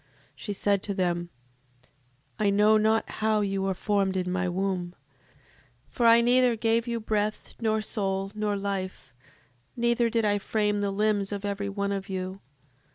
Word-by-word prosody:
She 210 - -6
said 200 0 +1
to 200 -1 -4
them: 175 -2 -1 1.1
I 210 -1 +3
know 210 +2 +4
not 220 +1 +2
how 215 -1 +2
you 195 -1 -1
were 190 -1 -1
formed 195 0 0
in 180 -1 -1
my 185 0 0
womb; 180 -1 -2 1.0
for 240 -3 +2
I 230 0 +7
neither 245 0 +4
gave 225 +1 +1
you 235 -1 -1
breath, 215 -1 -2
nor 220 -1 +1
soul, 195 -2 -2
nor 210 -1 -1
life, 195 -8 -4 0.6
neither 235 0 +2
did 230 -1 +1
I 205 0 +2
frame 210 0 0
the 200 - 0
limbs 205 0 0
of 205 0 -4
every 200 0 -2
one 200 0 -2
of 195 0 -4
you. 190 +1 -4
205 Hz, 160 wpm, -27 LUFS, 195-220 Hz, 1.1 s, I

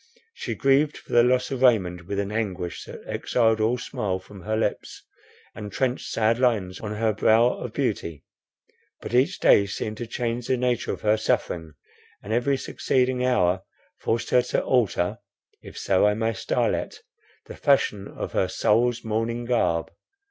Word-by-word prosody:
She - - -5
grieved 140 +2 +2
for - - -11
the 120 - +7
loss 125 +2 +2
of 130 -2 -3
Raymond 90 -9 +2
with 100 - -3
an 100 0 -2
anguish, 95 -6 -3
that - - -10
exiled 115 -2 +1
all 115 +3 +2
smile 100 -6 -3
from 95 +1 -13
her 110 +3 -2
lips, 110 - -3 0.5
and 105 -2 -7
trenched 130 +4 -1
sad 115 +1 +1
lines 105 -8 +1
on 105 -1 -5
her 110 0 +1
brow 110 +3 +4
of 125 - -6
beauty. 100 - -2 0.8
But - - -8
each 125 +2 +2
day 100 - +5
seemed 105 +2 -4
to 120 - -5
change 120 0 -3
the 130 - +1
nature 125 -1 0
of - - -6
her 105 0 +3
suffering, 80 -6 -1 0.5
and 105 - -4
every 125 +4 +1
succeeding 130 -1 0
hour 95 -8 +2 0.4
forced 115 +1 -1
her 125 - +5
to 125 - -1
alter 105 -8 +1 0.4
(if - - -12
so 95 +1 +3
I 105 - +2
may 115 +1 0
style - - 0
it) - - -4 0.4
the - - -10
fashion 105 -8 +1
of - - -6
her - - +1
soul's 120 +3 +1
mourning 115 +2 -2
garb. 85 -9 0
115 Hz, 170 wpm, -25 LUFS, 100-125 Hz, 0.8 s, the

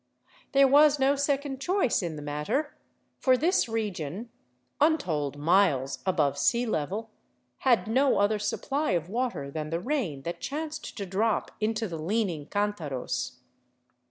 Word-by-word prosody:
There 275 0 +6
was 290 +2 +6
no 275 +1 +3
second 280 -1 -1
choice 365 - +1
in 170 -3 -3
the 150 - -7
matter, 150 - -2 0.4
for 255 -1 +4
this 330 -2 +2
region, 210 -1 -3 0.5
untold 165 - +1
miles 150 -4 +2
above 150 -7 +1
sea 240 +1 +2
level, 215 +3 -2 0.5
had 245 -3 +3
no 265 +5 +3
other 205 +1 +2
supply 270 +5 -1
of 170 -1 -1
water 230 - -2
than 155 0 -4
the 165 +1 -1
rain 190 - -2
that 170 +2 -5
chanced 310 +2 -5
to 200 - -3
drop 205 +4 0
into 220 +1 0
the 165 -4 -6
leaning 175 -4 -1
cantaros. 165 -12 -3
210 Hz, 140 wpm, -28 LUFS, 160-270 Hz, 0.5 s, There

